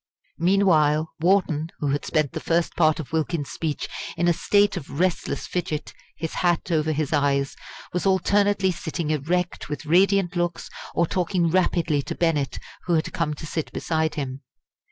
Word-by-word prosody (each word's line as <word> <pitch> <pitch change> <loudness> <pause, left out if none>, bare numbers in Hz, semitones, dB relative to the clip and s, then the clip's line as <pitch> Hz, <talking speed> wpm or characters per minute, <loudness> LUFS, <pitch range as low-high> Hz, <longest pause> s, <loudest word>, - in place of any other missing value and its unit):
Meanwhile 160 -4 +3
Wharton, 165 -3 +2
who 145 - -1
had 145 - -1
spent 155 -4 +1
the - - -4
first 170 0 0
part 155 -2 +3
of 155 - -6
Wilkins's 160 -2 -1
speech 155 -3 -3 0.3
in 175 +1 +2
a 175 - +5
state 205 +4 +3
of 140 +1 -6
restless 185 -1 0
fidget, 175 -4 -3 0.2
his 160 - -4
hat 175 0 0
over 155 -1 +2
his 155 0 -1
eyes, 140 -1 +1 0.4
was 180 +2 0
alternately 200 +1 +3
sitting 165 -2 -3
erect 170 +4 -1
with 150 +1 -5
radiant 190 +2 +3
looks, 175 -1 -2 0.2
or 170 - +3
talking 175 -1 0
rapidly 170 -4 +2
to - - -5
Bennett, 155 -5 0 0.3
who 175 - +2
had 160 - -1
come 150 -3 -1
to 155 - -8
sit 155 0 -3
beside 160 -1 -1
him. 135 -2 -4
165 Hz, 165 wpm, -24 LUFS, 150-180 Hz, 0.4 s, a